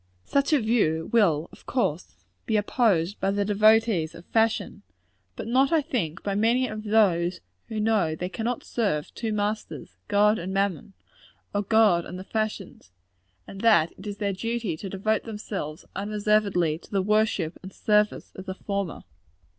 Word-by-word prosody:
Such 280 +1 +1
a 300 - +5
view 205 -9 +1
will, 170 -9 +3
of - - -18
course, 180 - -1 0.3
be 220 - +2
opposed 205 -4 +1
by 195 - 0
the 200 0 0
devotees 210 -4 +3
of 170 +1 -12
fashion; 225 -2 0 0.5
but - - -6
not, 260 +3 +3
I 320 -3 +3
think, 170 - -3
by 200 - -1
many 230 +5 +2
of 215 0 -6
those 185 -5 +2 0.3
who 220 - -4
know 210 -7 +1
they 180 +3 -4
cannot 230 +5 -3
serve 200 -11 -2
two 225 -2 -3
masters 205 - -3
God 210 +1 +3
and 180 +3 -5
mammon, 195 -1 -1 0.6
or 205 - +1
God 205 -4 +4
and 180 - -7
the 185 - -7
fashions 215 - -4 0.5
and 195 - -9
that 170 -8 +4
it 195 - -10
is 205 -1 -5
their 200 -2 -1
duty 230 -2 -2
to 195 - -6
devote 205 +3 -1
themselves, 205 -8 -6
unreservedly, 200 -5 +1
to - - -18
the 195 -2 0
worship 210 -5 +1
and 190 - -9
service 210 +1 +1
of 190 - -9
the 190 - -4
former. 200 -4 -3
205 Hz, 165 wpm, -26 LUFS, 180-220 Hz, 0.6 s, a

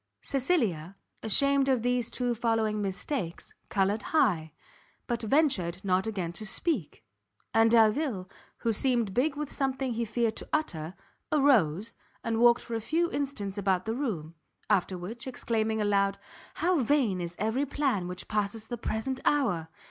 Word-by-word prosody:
Cecilia, 230 - 0 0.3
ashamed 275 +5 +3
of 255 -4 +2
these 245 -1 +1
two 245 -1 -1
following 225 -2 0
mistakes, 190 - -4 0.2
coloured 200 +2 +1
high; 185 - +1 0.5
but 235 -1 -2
ventured 220 - +1
not 190 +2 +2
again 185 -6 -3
to 215 - -5
speak; 210 - 0 0.5
and 225 0 +5
Delvile, 225 -2 +3 0.3
who 230 -1 0
seemed 235 -3 +1
big 280 +6 +1
with 295 -1 -4
something 265 -2 -1
he 230 +1 -1
feared 230 0 0
to - - -6
utter, 180 - -2 0.4
arose, 230 - +3 0.3
and 225 -1 -1
walked 240 0 +6
for 235 - -7
a 225 - -1
few 335 +8 0
instants 215 -9 -3
about 190 -2 +1
the 220 - -1
room; 200 - -3 0.4
after 185 -2 +2
which, 225 +8 -7
exclaiming 220 -3 -1
aloud 200 -1 +2 0.4
"How 350 -1 +2
vain 240 -8 +2
is 170 0 -4
every 235 +7 0
plan 260 -10 0
which 180 0 -6
passes 210 +1 -2
the 240 -2 -4
present 255 +5 -2
hour!" 205 - +1
225 Hz, 150 wpm, -29 LUFS, 195-265 Hz, 0.5 s, walked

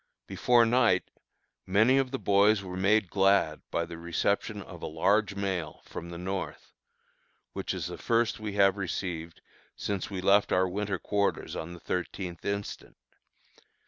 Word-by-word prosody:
Before 120 -1 +3
night, 120 0 +3 0.6
many 110 +8 +4
of 135 -1 0
the 135 - -3
boys 100 -1 +3
were 90 -1 -6
made 100 +1 +2
glad 95 -5 +3
by 85 - -1
the 85 0 -9
reception 85 0 -1
of - - -11
a - - -4
large 100 +6 +1
mail 95 -5 -3
from 85 - -7
the 85 - -7
North, 95 +2 -5 0.8
which - - -3
is - - -3
the - - -6
first 115 -1 +1
we 105 -2 -4
have 100 -1 +4
received 85 -3 -4 0.3
since 100 -2 -3
we 95 -2 -4
left 100 +2 +4
our 95 0 +3
winter 100 +1 -2
quarters 100 +2 -1
on 85 +2 -5
the 85 - -10
thirteenth 90 0 -4
instant. 100 0 -4
100 Hz, 155 wpm, -29 LUFS, 90-105 Hz, 0.8 s, many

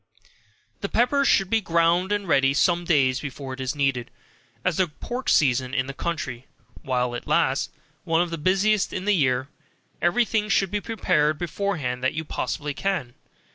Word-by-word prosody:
The - - -4
pepper 280 +4 +2
should 195 -7 +3
be 225 -1 +3
ground 170 +2 +2
and 205 -2 -1
ready 135 -3 +3
some 175 +2 +2
days 135 -6 +3
before 135 -1 -6
it 130 - -9
is 130 +2 -2
needed, 135 -4 0 0.6
as 180 - +1
the 185 - +3
pork 245 - -5
season 130 -2 +2
in 130 - +1
the 140 - -6
country 155 -5 -3
is - - -24 0.4
(while 125 -2 -1
it 120 - -6
lasts) - - +1 0.3
one 165 0 +1
of 175 - -6
the 165 - -4
busiest 195 +5 +2
in 185 - -4
the 210 - +3
year, 130 -6 +1 0.5
every 205 +8 +3
thing 215 0 -1
should 195 -2 +2
be 210 0 -1
prepared 155 -8 +1
beforehand 160 -8 -3
that 130 - +1
you 160 +1 -3
possibly 150 0 -3
can. 180 -8 -2
165 Hz, 180 wpm, -24 LUFS, 135-195 Hz, 0.6 s, should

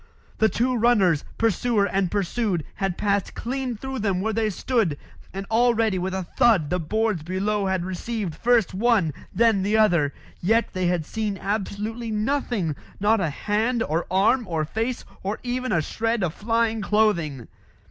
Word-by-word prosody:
The 220 - +4
two 245 +6 0
runners, 210 -10 +3
pursuer 225 0 +2
and 195 -2 0
pursued, 200 -2 -1
had 195 -2 -1
passed 200 -1 0
clean 255 -1 -3
through 265 +3 -5
them 200 -4 0
where 220 +3 -1
they 220 0 +1
stood, 210 - 0 0.3
and 195 +1 -5
already 225 -4 +3
with 185 +1 -2
a 190 - -2
thud 200 - +2
the 180 - +1
boards 215 +2 0
below 195 +4 -1
had 190 -2 0
received 190 0 -3
first 230 +3 +2
one, 200 -6 +2 0.2
then 225 -4 +3
the 205 +3 +1
other. 175 -10 +3 0.3
Yet 225 +6 +2
they 185 -2 0
had 175 -3 0
seen 215 0 -3
absolutely 215 +3 -3
nothing 215 - -1 0.2
not 215 +3 +3
a 170 -5 0
hand, 220 - 0
or 160 +3 -1
arm, 205 +6 +2
or 160 -3 -1
face, 225 +9 -3 0.2
or 200 +4 -2
even 255 0 -2
a 170 -6 +2
shred 225 +4 -1
of 165 -3 -1
flying 225 +1 0
clothing. 175 - +1
210 Hz, 165 wpm, -24 LUFS, 185-230 Hz, 0.3 s, The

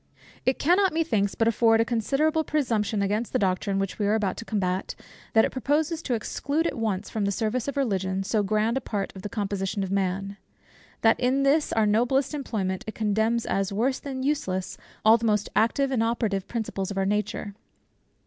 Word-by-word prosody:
It 260 - +3
cannot 360 +2 +3
methinks 220 -12 +1
but 225 - +2
afford 225 0 +4
a 225 - +3
considerable 280 +8 +1
presumption 225 -9 0
against 210 +4 -1
the - - +3
doctrine 195 +1 0
which 195 +1 -2
we 205 - +1
are 210 - +3
about 205 -4 0
to 230 - -7
combat, 185 -3 -2 0.4
that 220 - +6
it - - -3
proposes 300 +5 0
to 255 -7 -1
exclude 285 +8 -2
at 330 - -1
once 210 -4 -2
from 215 -2 -1
the 200 - +1
service 225 +5 -1
of 280 - -3
Religion 195 -7 0
so 210 +2 +1
grand 215 +4 +1
a - - -1
part 200 -4 -4
of 190 - -8
the 210 - -5
composition 200 -2 -2
of 190 - -4
man; 195 +1 -1 0.6
that 225 0 +4
in 260 +2 +2
this 290 +3 +3
our 220 -1 +2
noblest 245 +7 +2
employment 210 -10 -2
it 220 - -5
condemns 220 +2 +1
as 195 0 -1
worse 245 +6 0
than 265 -2 -5
useless, 190 -11 -1 0.3
all 225 +2 +7
the 230 - -3
most 210 -2 +1
active 265 +6 +2
and 250 -4 +1
operative 225 -4 0
principles 210 -5 -3
of 200 - -5
our 195 - +1
nature. 210 0 -2
220 Hz, 195 wpm, -26 LUFS, 200-260 Hz, 0.6 s, all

